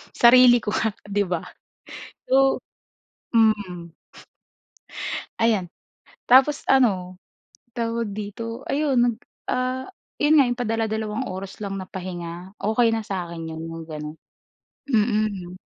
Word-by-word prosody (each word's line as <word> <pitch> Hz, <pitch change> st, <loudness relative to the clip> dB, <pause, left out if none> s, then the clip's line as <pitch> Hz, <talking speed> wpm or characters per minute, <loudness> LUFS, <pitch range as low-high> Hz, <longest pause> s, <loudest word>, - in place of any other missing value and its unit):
Sarili 245 Hz, 0 st, +7 dB
ko -, -, -2 dB
nga, 220 Hz, -, +1 dB, 0.2 s
di 205 Hz, 0 st, +1 dB
ba? 175 Hz, -2 st, -2 dB, 0.9 s
So 270 Hz, +1 st, +4 dB, 0.8 s
mm. 200 Hz, -7 st, +1 dB, 1.4 s
Ayan. 215 Hz, -6 st, +2 dB, 0.6 s
Tapos 270 Hz, +4 st, +6 dB
ano, 190 Hz, -9 st, +3 dB, 0.6 s
tawag 230 Hz, -3 st, -2 dB
dito, 230 Hz, +3 st, -6 dB
ayun 285 Hz, -2 st, +1 dB
nag, 240 Hz, -2 st, +2 dB, 0.3 s
ah, 255 Hz, +2 st, -1 dB, 0.3 s
yun 300 Hz, +1 st, +5 dB
nga 275 Hz, -, +7 dB
yung 245 Hz, 0 st, -2 dB
padala-dalawang 220 Hz, 0 st, -1 dB
oras 190 Hz, -2 st, -6 dB
lang 195 Hz, -2 st, -4 dB
na 185 Hz, -, -10 dB
pahinga, 180 Hz, 0 st, -7 dB
okey 225 Hz, +2 st, +2 dB
na 225 Hz, -, 0 dB
sa'kin 170 Hz, -5 st, -5 dB
yun, 160 Hz, 0 st, -6 dB
yung 165 Hz, 0 st, -7 dB
ganun. 150 Hz, 0 st, -6 dB, 0.7 s
Mm. 210 Hz, -7 st, 0 dB
215 Hz, 115 wpm, -24 LUFS, 185-245 Hz, 1.4 s, Sarili